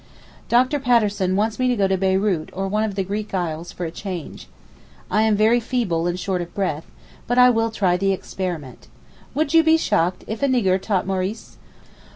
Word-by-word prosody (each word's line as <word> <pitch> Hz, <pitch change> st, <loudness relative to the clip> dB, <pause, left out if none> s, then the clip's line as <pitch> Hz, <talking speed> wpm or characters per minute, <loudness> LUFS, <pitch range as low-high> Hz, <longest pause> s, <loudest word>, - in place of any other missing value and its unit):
Dr. 255 Hz, +5 st, +3 dB
Patterson 210 Hz, -7 st, +2 dB
wants 215 Hz, +3 st, 0 dB
me 255 Hz, -, +2 dB
to 250 Hz, -, +2 dB
go 200 Hz, -3 st, +2 dB
to 190 Hz, -, +1 dB
Beyrout 190 Hz, -3 st, 0 dB
or 195 Hz, +1 st, -3 dB
one 210 Hz, +3 st, 0 dB
of 210 Hz, -3 st, -2 dB
the 195 Hz, -, 0 dB
Greek 205 Hz, +2 st, -4 dB
isles 170 Hz, -1 st, -3 dB
for 180 Hz, -, -5 dB
a 160 Hz, -, -4 dB
change. 180 Hz, -3 st, -7 dB, 0.6 s
I 215 Hz, -, +3 dB
am 220 Hz, -1 st, +3 dB
very 220 Hz, +3 st, +4 dB
feeble 220 Hz, -9 st, -1 dB
and 175 Hz, +1 st, -2 dB
short 185 Hz, -1 st, -2 dB
of 175 Hz, 0 st, -8 dB
breath—but 195 Hz, +6 st, -4 dB
I 250 Hz, 0 st, +7 dB
will 225 Hz, -1 st, +1 dB
try 190 Hz, -5 st, +1 dB
the 195 Hz, +1 st, +1 dB
experiment. 175 Hz, -8 st, -5 dB, 0.5 s
Would 310 Hz, +1 st, 0 dB
you 325 Hz, 0 st, +6 dB
be 320 Hz, 0 st, +5 dB
shocked 185 Hz, -, 0 dB
if 220 Hz, 0 st, -5 dB
a 280 Hz, -, +3 dB
nigger 195 Hz, -8 st, +2 dB
taught 195 Hz, -3 st, 0 dB
Maurice? 190 Hz, +3 st, -4 dB
200 Hz, 195 wpm, -22 LUFS, 185-225 Hz, 0.6 s, I